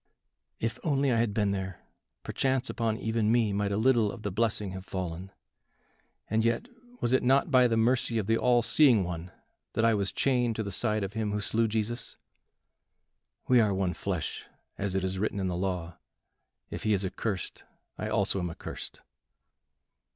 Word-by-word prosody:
"If 115 0 -2
only 140 -3 +2
I 115 - +2
had 115 -2 +1
been 105 -1 +1
there, 95 -2 -4 0.4
perchance 130 -1 0
upon 115 -2 -1
even 110 -1 0
me 115 -3 +2
might 100 0 0
a 100 - 0
little 115 -2 +3
of 110 - -10
the 100 - -2
blessing 105 -1 0
have 95 0 -7
fallen. 90 -1 -5 1.0
And 110 +1 +1
yet, 115 - 0 0.3
was 120 - +1
it 130 - +4
not 135 +5 +3
by 125 -2 +6
the 115 -1 +1
mercy 120 0 +2
of 110 - 0
the 115 +2 +2
all 120 0 +3
seeing 115 -3 +5
One 85 0 -5 0.4
that 115 - +2
I 115 - +5
was 100 -2 0
chained 125 -4 +1
to 110 - -2
the 100 - -5
side 110 +1 0
of 95 +1 -4
him 110 -2 -1
who 105 - 0
slew 115 +2 +1
Jesus? 110 +2 -3 1.3
We 125 -2 +6
are 105 -3 +2
one 95 -2 0
flesh, 90 -1 -4 0.3
as 100 -1 -3
it 95 - 0
is 95 0 -2
written 105 0 -1
in 95 -1 -1
the 90 - -2
law; 90 -2 -3 0.7
if - - -5
he 110 - +2
is 95 -1 +1
accursed, 95 +1 -3 0.4
I - - -2
also 95 - +1
am 90 -1 -2
accursed." 85 - -8
110 Hz, 185 wpm, -29 LUFS, 95-115 Hz, 1.3 s, by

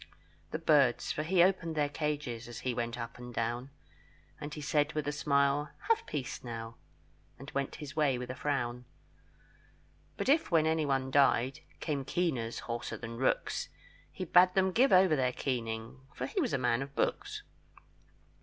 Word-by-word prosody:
The - - -2
birds, 145 -6 +3
for - - -2
he 170 +3 +4
opened 180 -3 +1
their 150 -1 +2
cages, 145 -6 -3
As 120 -1 -8
he 130 - -1
went 120 0 -3
up 115 0 -6
and 125 0 -8
down; 120 +3 -2 0.7
And 145 - -6
he 150 - -6
said 145 0 +1
with 150 -2 -2
a - - +1
smile, 140 0 +2 0.2
"Have 455 0 +2
peace, 130 -4 -4
now," 115 -1 -6 0.6
And 135 +2 -10
went 140 -1 -2
his 150 -1 -8
way 145 -5 +2
with 125 0 -5
a - - -6
frown. 125 -4 -2 1.3
But - - -2
if 300 +4 +3
when 165 -3 +4
anyone 140 -5 +1
died, 135 -2 +3 0.2
Came 145 -4 -1
keeners 130 -7 -1
hoarser 120 0 -4
than 115 0 -7
rooks, 130 - 0 0.4
He 185 - -5
bade 180 +2 +5
them 190 0 +3
give 255 +8 +4
over 185 -3 +6
their 130 -3 +1
keening, 115 -2 -3 0.2
For 125 - -3
he - - -1
was - - 0
a - - +3
man 125 -1 +1
of 140 0 -7
books. 415 +1 -1
140 Hz, 175 wpm, -32 LUFS, 125-155 Hz, 1.3 s, over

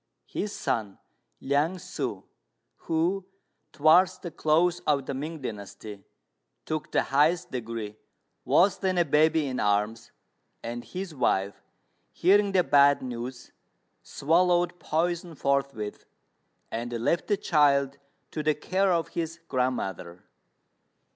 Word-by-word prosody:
His 205 - -4
son, 110 - -2 0.4
Liang 145 +6 +1
ssŭ, 180 - -5 0.6
who, 180 +4 0 0.4
towards 175 +5 +4
the 175 - -8
close 170 +4 +2
of 140 -3 +2
the 140 - -4
Ming 150 +2 -5
dynasty, 105 -2 -7 0.6
took 155 0 -4
the - - +2
highest 155 +6 +2
degree, 115 -4 -5 0.5
was 190 +2 +3
then 190 -2 0
a 175 - +4
baby 155 +1 +3
in 130 -2 -3
arms; 105 +2 0 0.5
and 120 +1 -5
his 185 -2 -6
wife, 100 -7 0 0.5
hearing 200 +3 +3
the 185 -2 +3
bad 140 -2 +4
news, 125 0 -6 0.5
swallowed 175 +3 +1
poison 170 +1 -1
forthwith, 140 -7 -2 0.7
and 120 +2 -4
left 120 +9 0
the 205 - +2
child 140 -6 +2 0.3
to 155 - -3
the 155 0 +1
care 190 +5 +1
of 165 -3 0
his 165 0 -4
grandmother. 95 -9 -2
150 Hz, 120 wpm, -27 LUFS, 120-175 Hz, 0.7 s, towards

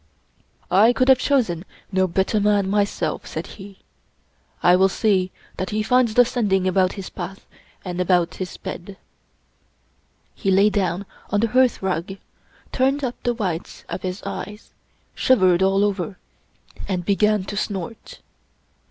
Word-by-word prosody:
"I 210 +6 +6
could 255 +2 +2
have 260 -1 +7
chosen 230 - +1 0.3
no 190 -1 +2
better 190 +4 0
man 205 -1 +2
myself/' 205 0 -1
said - - -5
he. 195 -1 -12 0.4
" - - -36
I 180 - +6
will 190 +1 +4
see 190 -2 +1 0.3
that 185 - -3
he 215 0 -1
finds 250 -1 +2
the 245 - +7
Sending 200 -6 0
about 185 0 +2
his 195 -2 -7
path 185 +2 -7 0.4
and 180 0 -3
about 175 -2 +2
his 185 - -5
bed/' 195 +3 -7 1.4
He 195 - -2
lay 200 +2 +4
down 190 -1 -1 0.2
on 205 - +1
the 230 - +1
hearthrug, 195 -7 +1 0.5
turned 270 +2 +1
up 250 -2 -1
the 240 -1 0
whites 185 -6 -4
of - - -4
his 185 +1 -5
eyes, 210 +2 -7 0.4
shivered 185 -8 +3
all 195 +1 +3
over, 200 -2 -2 0.7
and 180 -3 -2
began 210 0 +2
to 205 - -6
snort. 205 +1 -5
195 Hz, 145 wpm, -22 LUFS, 185-215 Hz, 1.4 s, have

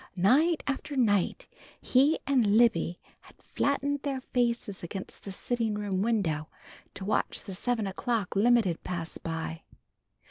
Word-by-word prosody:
Night 295 - +4
after 280 +1 -3
night 225 - +1 0.3
he 275 +5 +3
and 240 -7 +3
Libby 225 -7 +3 0.2
had - - -19
flattened 280 0 -1
their 275 -2 -2
faces 235 -5 -1
against 190 +2 -7
the 200 - -5
sitting 225 +2 -1
room 200 -2 -1
window 180 -9 0 0.5
to 190 - -6
watch 210 - 0
the 195 - -7
seven 225 +3 -1
o'clock 205 +1 -2
limited 215 -5 +3
pass 170 -2 -5
by. 165 0 -4
220 Hz, 135 wpm, -29 LUFS, 190-255 Hz, 0.5 s, Night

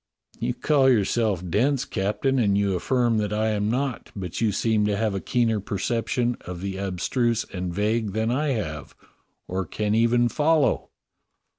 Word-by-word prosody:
"You 120 +1 -1
call 135 +1 +3
yourself 105 -5 +1
dense. 125 - +1
Captain, 115 +7 0
and 100 -4 +2
you 100 -1 +1
aflSrm 120 +4 +1
that 105 -1 -1
I 110 +1 +1
am 105 -1 0
not; 130 +1 -2
but 90 -2 -5
you 110 -2 +3
seem 110 +1 +1
to 105 -1 0
have 110 -1 0
a 95 - -2
keener 115 -3 +1
perception 115 +4 -1
of 90 0 -7
the 95 0 -4
abstruse 110 +5 0
and 90 -1 -3
vague 105 +2 0
than 110 +2 0
I 145 +5 0
have, 75 - -5 0.5
or 95 +1 -2
can 105 +4 -2
even 115 +2 +3
follow." 150 +2 +2
110 Hz, 165 wpm, -25 LUFS, 100-120 Hz, 0.5 s, call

